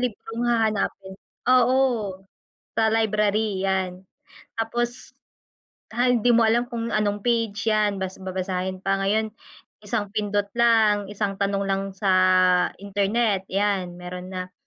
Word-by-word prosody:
librong 240 0 -3
hahanapin, 215 -4 0 0.3
oo, 255 +1 +4 1.0
sa 220 -1 +3
library 210 -2 +1
'yan. 190 -1 -1 0.5
Tapos, 240 +2 -3 0.8
han 245 -1 +3
hindi 245 - +1
mo 230 -1 +5
alam 240 +2 +2
kung 230 -2 -4
anong 205 0 0
page 225 -3 0
'yan 210 -2 +2
bas 190 0 -5
babasahin 185 0 -3
pa, 195 0 +1
ngayon 215 +2 0 0.5
isang 205 -1 -3
pindot 205 -1 0
lang, 220 -4 +3
isang 200 -1 -2
tanong 200 0 0
lang 195 0 0
sa 195 0 0 0.7
internet 200 0 0
'yan, 195 -3 -1
meron 180 +1 -8
na. 185 0 -5
205 Hz, 125 wpm, -24 LUFS, 195-225 Hz, 1.0 s, mo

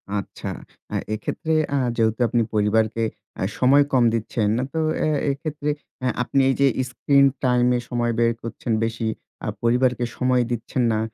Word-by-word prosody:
আচ্ছা। 100 - -5 0.5
আ - - -1 0.2
এক্ষেত্রে 135 +8 -2 0.2
আ - - +2 0.2
যেহেতু 110 0 +1
আপনি 120 0 +1
পরিবারকে 110 +2 +2 0.4
আ - - +1
সময় 140 +3 +5
কম 125 -2 +5
দিচ্ছেন, 110 -1 0 0.2
তো 160 - -1 0.2
অ্যা - - +1 0.2
এক্ষেত্রে 145 +1 -4 0.3
অ্যা 130 - +1
আপনি 135 +3 0
এই 135 - +2
যে 140 - +6 0.2
স্ক্রিন 140 +2 +3 0.2
টাইমে 125 -1 +3
সময় 120 -1 0
ব্যায় 115 0 +3
করছেন 115 +1 -5
বেশি, 115 0 -2 0.4
আ - - -3
পরিবারকে 125 +1 +2
সময় 125 -1 +2
দিচ্ছেন 120 +2 -1
না। 110 - 0
120 Hz, 155 wpm, -23 LUFS, 115-130 Hz, 0.5 s, যে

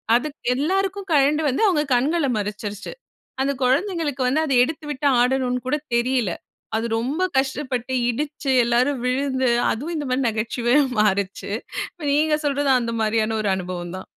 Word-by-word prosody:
அது 245 +5 +1 0.3
எல்லாருக்கும் 385 +6 -1
கழண்டு 295 +2 +3
வந்து 265 - 0
அவுங்க 310 -6 +2
கண்கள 295 +6 +1
மறச்சிருச்சு. 210 - -5 0.5
அந்த 275 - +1
குழந்தைகளுக்கு 290 0 0
வந்து 290 +5 +2
அத 275 - -1
எடுத்துவிட்டு 295 -1 -3
ஆடணுனு 250 0 +1
கூட 295 - +1 0.2
தெரியல. 235 -5 +1 0.5
அது 225 - -2
ரொம்ப 285 +10 -1
கஷ்டப்பட்டு 265 -2 -1 0.2
இடிச்சு, 285 +2 -2
எல்லாரும் 245 +3 +1
விழுந்து 260 0 0 0.2
அதுவும் 300 +9 -4
இந்தமாரி 270 -3 -1
நகைச்சுவையா 235 +5 +1 0.2
மாறுச்சு. 200 -1 0 0.4
இப்ப 340 - -14
நீங்க 300 +1 +2
சொல்றதும் 280 -2 +2
அந்தமாரியான 225 -1 0
ஒரு 205 - 0
அனுபவம் 180 -1 -5
தான். - - -9
260 Hz, 135 wpm, -22 LUFS, 230-295 Hz, 0.5 s, கழண்டு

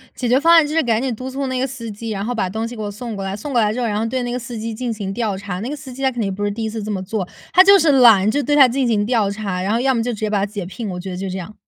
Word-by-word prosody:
解 250 - -2
决 250 +2 +4
方 330 +4 +4
案 330 -3 +7
就 300 - -4
是 325 - +3
赶 230 -4 +1
紧 260 -3 -1
督 255 +4 -6
促 275 +1 -3
那 260 -1 -2
个 260 - 0
司 240 -4 -7
机， 220 +2 -6
然 200 -1 -3
后 245 - -2
把 200 -5 -1
东 220 +4 -3
西 240 - -7
给 215 - -5
我 205 - -3
送 225 +2 -6
过 195 - -4
来， 195 +1 -3
送 280 +7 -6
过 240 - +3
来 210 -1 +2
之 245 - -3
后 240 - 0
然 210 -1 -1
后 225 - -1
对 255 +2 -2
那 245 0 -3
个 250 - -2
司 235 -1 -7
机 225 0 -4
进 240 +1 -3
行 200 -3 -4
调 215 -3 -2
查。 190 -2 -5
那 230 - -4
个 295 - -3
司 270 -3 -10
机 265 +2 -8
他 265 - +3
肯 245 -2 -5
定 195 -3 -1
不 205 +2 -3
是 205 - 0
第 225 +2 -5
一 220 - -2
次 220 0 -5
这 210 - -5
么 195 -3 -2
做， 190 0 -3 0.3
他 370 - +8
就 395 +1 +7
是 320 -3 +3
懒， 225 -7 +6
就 285 +5 0
对 290 +1 +1
他 270 -3 +8
进 255 +1 0
行 215 -3 +1
调 220 -4 +1
查， 200 -3 -3
然 195 - -1
后 230 - +1
要 265 +1 +2
么 230 - 0
就 245 +1 -2
直 215 - -7
接 215 -1 -1
把 210 - +1
他 200 - 0
解 205 -2 -6
聘， 205 +4 -6
我 180 -1 -5
觉 190 +1 -6
得 180 - -5
就 190 +1 -4
这 185 +1 -4
样。 195 +4 -9
225 Hz, 425 characters per minute, -20 LUFS, 205-255 Hz, 0.3 s, 他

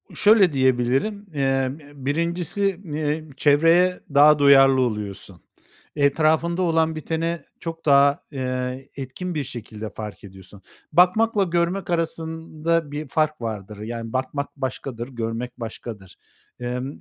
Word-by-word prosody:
Şöyle 205 -5 +5
diyebilirim, 130 - +2 0.2
ımm, 135 0 0
ııı, 145 -3 -14
1.’si 170 +5 0
n 150 -5 -5 0.2
iii, 155 -1 -12
çevreye 165 +5 +4
daha 150 +1 +7
duyarlı 135 -2 +6
oluyorsun. 100 -6 -4 0.5
Etrafında 155 +4 +2
olan 160 -2 +2
biteni 165 +2 -2 0.2
çok 165 -1 -7
daha, 140 +2 +4
ııı, 130 -1 -3
etkin 140 +7 -5
bir 150 - -1
şekilde 110 -4 -7
fark 105 -1 -8
ediyorsun. 95 0 -13 0.3
Bakmakla 200 +4 +4
görmek 175 +2 -1
arasında 165 -1 -2
bir 150 +1 -5
fark 155 0 0
vardır. 105 -2 -5
Yani, 115 +1 -6
bakmak 135 +2 -2
başkadır, 130 -3 -4
görmek 120 0 -5
başkadır. 110 -4 -8 0.4
Imm, 125 +2 -3
140 Hz, 120 wpm, -23 LUFS, 125-165 Hz, 0.5 s, daha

